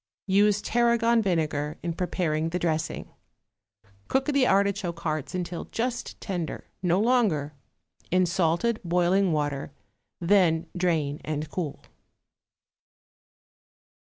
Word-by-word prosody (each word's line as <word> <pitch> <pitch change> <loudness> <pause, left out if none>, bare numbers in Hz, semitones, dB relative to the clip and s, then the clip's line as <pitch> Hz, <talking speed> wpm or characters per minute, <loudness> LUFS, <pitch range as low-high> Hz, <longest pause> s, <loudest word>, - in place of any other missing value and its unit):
Use 205 +1 +3
tarragon 235 0 +3
vinegar 155 -6 -1
in 170 -1 -1
preparing 165 -3 -1
the 175 - -1
dressing. 160 -3 -2 1.0
Cook 265 0 +1
the 280 -4 +3
artichoke 195 -3 +1
hearts 155 +1 -2
until 175 -1 -4
just 240 +1 -3
tender, 175 -6 -4 0.2
no 180 0 +2
longer, 205 - +2 0.6
in 185 +1 +3
salted 175 +6 +1
boiling 180 +2 +2
water, 145 -2 -1 0.5
then 170 -3 +3
drain 160 -5 0
and 155 0 -3
cool. 165 -6 -4
180 Hz, 100 wpm, -26 LUFS, 160-205 Hz, 1.0 s, Use